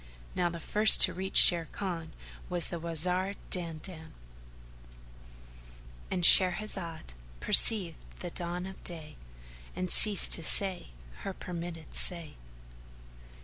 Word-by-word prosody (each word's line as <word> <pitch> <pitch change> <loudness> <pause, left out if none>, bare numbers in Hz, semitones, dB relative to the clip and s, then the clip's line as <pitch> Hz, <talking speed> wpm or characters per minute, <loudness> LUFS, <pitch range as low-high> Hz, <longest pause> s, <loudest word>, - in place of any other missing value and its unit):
Now 175 -1 -2
the 170 0 -9
first 210 +6 +4
to - - +4
reach 190 +1 -8
Sharrkan 170 0 +2 0.4
was 175 -2 -1
the 170 - -7
Wazir 180 +4 -2 0.2
Dandan,—And - - -11
Shahrazad 180 - +1 0.3
perceived 180 - +4 0.2
the 175 - -8
dawn 175 +1 -5
of 190 0 -12
day 155 -4 -6 0.6
and 185 0 -5
ceased 210 -3 +4
to - - +2
say 190 +1 -1 0.3
her 195 - -8
permitted 170 -2 -9
say. 170 -4 -1
170 Hz, 105 wpm, -28 LUFS, -, 0.6 s, first